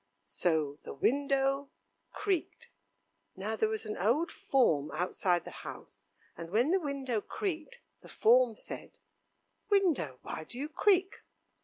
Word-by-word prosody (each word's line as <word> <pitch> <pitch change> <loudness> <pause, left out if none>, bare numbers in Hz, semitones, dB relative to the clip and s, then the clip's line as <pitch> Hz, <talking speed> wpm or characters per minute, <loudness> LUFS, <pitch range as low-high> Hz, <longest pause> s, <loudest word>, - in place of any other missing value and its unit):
So 155 -4 0
the - - -8
window 275 - +1 0.4
creaked. 390 -6 -2 0.6
Now 205 +3 -3
there 220 0 +1
was 220 0 -2
an 215 - -4
old 250 - +2
form 155 - +2
outside 180 -1 +1
the - - -7
house, - - -10 0.3
and 165 0 -7
when 235 - +2
the 380 - +4
window 275 - -2
creaked, 390 - -4 0.2
the - - -14
form 240 0 +4
said: - - -9 0.7
"Window, 345 - +2
why - - -5
do 245 - -9
you 290 +3 -3
creak?" 380 +2 +2
255 Hz, 135 wpm, -32 LUFS, 190-310 Hz, 0.7 s, the